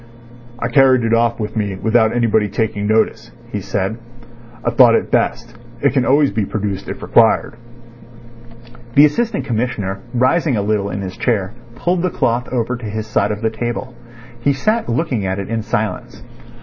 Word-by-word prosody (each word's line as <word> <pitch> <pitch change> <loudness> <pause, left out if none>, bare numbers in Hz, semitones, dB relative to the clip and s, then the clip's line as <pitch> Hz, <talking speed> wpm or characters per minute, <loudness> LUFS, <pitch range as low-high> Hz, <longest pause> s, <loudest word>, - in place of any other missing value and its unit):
"I 120 - -2
carried 130 -1 +4
it 115 0 +1
off 115 0 +2
with 105 0 -4
me 105 -3 -1
without 110 +3 +2
anybody 110 -3 +2
taking 105 0 -2
notice," 110 +1 +1 0.2
he 105 - -3
said. 100 +4 -2 0.7
"I 120 - +2
thought 120 -1 +6
it - - -1
best. 120 0 0 0.2
It 140 -2 +2
can 130 -3 +2
always 140 +1 +3
be 110 - -1
produced 100 -1 -4
if - - -6
required." 115 0 +3 1.4
The 145 - +8
Assistant 230 +10 -1
Commissioner, 110 -5 -2 0.2
rising 130 +2 +2
a 100 - 0
little 105 -1 0
in 100 - -4
his 95 +2 -6
chair, 110 -4 0 0.2
pulled 175 +6 0
the 185 - +1
cloth 120 -5 -1
over 125 0 -1
to 120 - -9
his 110 +1 -4
side 105 -2 0
of 105 +1 -5
the 110 - +1
table. 120 +3 -4 0.5
He 140 +4 +2
sat 215 - 0
looking 120 -3 -1
at 95 0 -2
it 100 0 -5
in 115 -1 -1
silence. 110 0 -3
115 Hz, 175 wpm, -18 LUFS, 105-125 Hz, 1.4 s, The